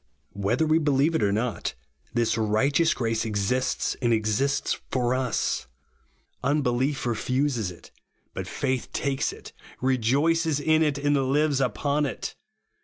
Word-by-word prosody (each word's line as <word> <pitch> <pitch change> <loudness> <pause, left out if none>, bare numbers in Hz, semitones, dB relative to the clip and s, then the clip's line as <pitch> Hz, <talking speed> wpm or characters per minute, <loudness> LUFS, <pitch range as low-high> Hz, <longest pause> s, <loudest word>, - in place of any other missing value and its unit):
Whether 100 +10 +1
we 155 +1 +3
believe 145 +1 +2
it 160 - +1
or 100 -1 +2
not, 110 - -2 0.4
this 120 -1 +1
righteous 125 +9 +2
grace 115 -2 0
exists, 110 +4 0
and 120 -2 +2
exists 115 +6 0
for 125 -1 +1
us. 130 -3 -1 0.8
Unbelief 135 -1 +1
refuses 125 -1 0
it; 90 - -13 0.4
but - - -5
faith 130 -1 -2
takes 135 -1 0
it, - - -12 0.3
rejoices 140 +6 +2
in 155 +2 +3
it, 150 -3 +2
and 145 +1 +1
lives 140 +1 +2
upon 140 +5 0
it. - - -5
130 Hz, 130 wpm, -26 LUFS, 115-145 Hz, 0.8 s, we